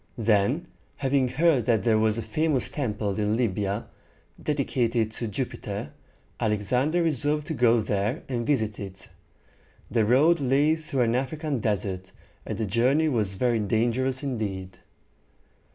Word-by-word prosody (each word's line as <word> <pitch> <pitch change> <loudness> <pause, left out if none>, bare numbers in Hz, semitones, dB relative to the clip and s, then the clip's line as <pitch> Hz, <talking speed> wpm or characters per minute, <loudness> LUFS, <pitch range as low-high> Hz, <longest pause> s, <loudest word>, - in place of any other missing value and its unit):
Then, 115 - +2 0.3
having 135 -1 +1
heard 135 -1 +2
that 110 -5 +2
there 110 -1 +3
was 110 0 +2
a 115 - -2
famous 145 +4 0
temple 105 -7 -2
in 105 +1 +1
Lib´y 105 -4 0
a, 100 +4 -3 0.5
dedicated 120 -6 0
to 115 +1 -4
Jupiter, 100 - -4 0.5
Alexander 125 - +1
resolved 150 -1 +1
to 160 - -3
go 120 -3 +4
there 105 +6 -1
and 120 -3 -2
visit 110 -7 0
it. 95 -1 -8 0.8
The 115 -2 +3
road 145 +10 +4
lay 140 +3 +3
through 155 -5 -2
an 115 -1 +1
African 140 +2 -2
desert, 95 -3 -2 0.3
and 110 - -3
the 110 - -1
journey 130 - +2
was 105 -7 0
very 120 +2 +1
dangerous 120 +6 0
indeed. 95 -8 -4
120 Hz, 140 wpm, -26 LUFS, 105-135 Hz, 0.8 s, go